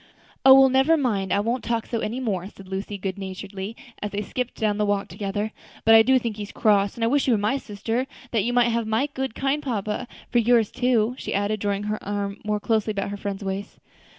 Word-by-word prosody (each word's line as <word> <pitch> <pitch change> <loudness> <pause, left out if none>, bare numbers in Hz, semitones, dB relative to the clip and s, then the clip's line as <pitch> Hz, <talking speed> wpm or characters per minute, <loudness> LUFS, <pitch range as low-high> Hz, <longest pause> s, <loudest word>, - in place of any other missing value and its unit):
"O! 265 0 +10
well, 265 0 +7
never 270 +5 +4
mind, 210 -9 0
I - - +3
won't 235 +4 -1
talk 230 -2 -1
so 230 - -2
any 225 +4 -3
more," 195 -7 -2
said 195 -2 -14
Lucy, 195 +2 -4
good 195 0 -4
naturedly, 195 +2 -6 0.3
as 210 - -2
they 205 +1 -3
skipped 250 +4 -4
down 210 -1 0
the 210 - +2
walk 205 0 0
together; 205 +1 -3 0.3
"but 225 - +7
I 225 - +9
do 260 +3 +4
think 230 -4 -3
he's 205 -1 -6
cross, 205 -2 +2
and 235 - -3
I - - +3
wish 280 +3 +2
you 245 - +4
were - - +1
my 210 +7 +1
sister, 225 +2 -3 0.2
that 225 -4 +1
you 240 - 0
might 245 -1 +4
have 230 -1 -1
my 220 +5 +1
kind, 265 -3 -4
good 275 +2 0
papa 215 -4 -3 0.2
for 240 - +4
yours 230 -2 +3
too," 245 -2 +2
she - - -3
added, 205 +2 0
drawing 200 0 -1
her 210 +1 -3
arm 200 0 -3
more 210 0 -1
closely 220 0 0
about 200 -1 -2
her 205 - -4
friend's 200 0 -4
waist. 195 +1 -4
215 Hz, 235 wpm, -24 LUFS, 200-240 Hz, 0.3 s, O